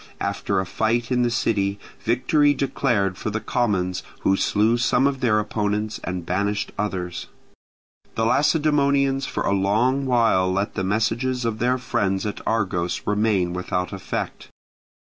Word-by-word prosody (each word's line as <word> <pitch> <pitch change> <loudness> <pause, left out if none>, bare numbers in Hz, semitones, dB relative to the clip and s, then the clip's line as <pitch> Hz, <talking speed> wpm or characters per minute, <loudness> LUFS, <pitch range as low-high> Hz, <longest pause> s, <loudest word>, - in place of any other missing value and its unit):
After 100 0 -1
a 95 - -1
fight 115 +6 -1
in 125 -1 +2
the 120 - +2
city, 100 -4 0 0.3
victory 135 +5 +3
declared 120 -8 0
for - - -2
the 110 0 -2
commons, 100 -6 -1 0.2
who 95 - +3
slew 110 +4 +2
some 125 +1 +2
of 140 -1 +1
their 115 -4 +2
opponents 105 0 -2
and 90 -2 -4
banished 100 +3 -1
others. 95 -4 -3 0.9
The 110 - +1
Lacedaemonians 140 -1 +2
for - - -3
a - - +1
long 115 +8 +1
while 115 -7 +3
let 100 +2 -1
the 95 - -2
messages 115 +5 0
of 110 -2 -2
their 125 +1 +2
friends 100 -5 -1
at 105 - -4
Argos 90 -6 -1
remain 105 -4 +1
without 90 +1 -2
effect. 95 - -5
110 Hz, 145 wpm, -23 LUFS, 95-125 Hz, 0.9 s, victory